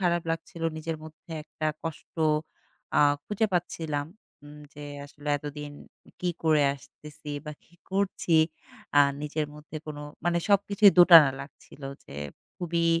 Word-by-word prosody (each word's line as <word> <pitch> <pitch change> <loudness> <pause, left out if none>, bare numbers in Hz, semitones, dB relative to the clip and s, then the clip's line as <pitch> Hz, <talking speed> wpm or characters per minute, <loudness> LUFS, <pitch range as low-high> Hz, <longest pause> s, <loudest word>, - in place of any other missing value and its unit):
খারাপ 175 -2 +2
লাগছিল। 165 0 -5
নিজের 160 0 -3
মধ্যে 160 +3 -14
একটা 155 0 -4 0.2
কষ্ট 165 -2 -7 0.8
আ - - +6 0.2
খুঁজে 210 +1 0
পাচ্ছিলাম 160 -4 -1 0.4
উম 145 0 -12 0.2
যে 145 0 -8 0.2
আসলে 145 +1 -9
এতদিন 145 0 -7 0.5
কি 180 - +1
করে 155 -2 +4
আসতেছি 150 +2 -12
বা 150 - -5
কি 175 - -25 0.2
করছি। 190 -3 +1 0.6
আ - - +9 0.2
নিজের 150 0 -2
মধ্যে 150 +1 -10
কোন 155 -1 -6 0.3
মানে 170 0 +2
সবকিছুই 200 0 +5
দোটানা 165 -5 +10
লাগছিল 140 0 -13 0.2
যে - - -11 0.4
খুবই 170 -1 0
160 Hz, 135 wpm, -28 LUFS, 150-175 Hz, 0.8 s, দোটানা